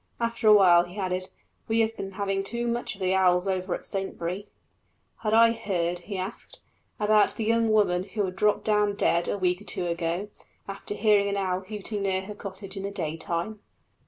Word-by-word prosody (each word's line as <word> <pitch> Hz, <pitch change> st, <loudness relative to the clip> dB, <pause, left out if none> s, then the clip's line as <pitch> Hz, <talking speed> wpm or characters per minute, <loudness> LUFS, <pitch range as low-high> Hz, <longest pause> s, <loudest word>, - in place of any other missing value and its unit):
After 230 Hz, -1 st, -1 dB
a 215 Hz, -, +9 dB
while 175 Hz, -4 st, +6 dB
he 175 Hz, +3 st, -12 dB
added, 185 Hz, -1 st, -2 dB, 0.4 s
"We 225 Hz, 0 st, +2 dB
have 225 Hz, 0 st, 0 dB
been 195 Hz, -2 st, -6 dB
having 195 Hz, 0 st, -1 dB
too 235 Hz, +4 st, -3 dB
much 235 Hz, -2 st, -2 dB
of 195 Hz, -, -15 dB
the 185 Hz, 0 st, +2 dB
owls 180 Hz, -1 st, +3 dB
over 185 Hz, -1 st, -1 dB
at -, -, -6 dB
Saintbury." 190 Hz, 0 st, -3 dB, 0.7 s
Had 215 Hz, 0 st, 0 dB
I 230 Hz, 0 st, +7 dB
heard, 180 Hz, -6 st, -1 dB
he 195 Hz, +3 st, -6 dB
asked, 190 Hz, +4 st, -6 dB, 0.4 s
about 210 Hz, 0 st, +4 dB
the 225 Hz, -, -3 dB
young 230 Hz, +1 st, +2 dB
woman 185 Hz, -4 st, +2 dB
who 205 Hz, +1 st, -2 dB
had 185 Hz, -1 st, -5 dB
dropped 210 Hz, +2 st, +2 dB
down 210 Hz, -1 st, +2 dB
dead 170 Hz, -3 st, +2 dB
a -, -, -1 dB
week 180 Hz, 0 st, 0 dB
or -, -, -13 dB
two 180 Hz, -, -2 dB
ago, 170 Hz, +3 st, -2 dB, 0.4 s
after 195 Hz, +1 st, -5 dB
hearing 205 Hz, -1 st, +3 dB
an 200 Hz, -, -1 dB
owl 185 Hz, -2 st, 0 dB
hooting 205 Hz, +1 st, -5 dB
near 190 Hz, -1 st, 0 dB
her 210 Hz, +2 st, -7 dB
cottage 195 Hz, -1 st, -8 dB
in 195 Hz, -, -4 dB
the 200 Hz, -, -3 dB
daytime? 170 Hz, +2 st, -3 dB
195 Hz, 200 wpm, -27 LUFS, 185-210 Hz, 0.7 s, a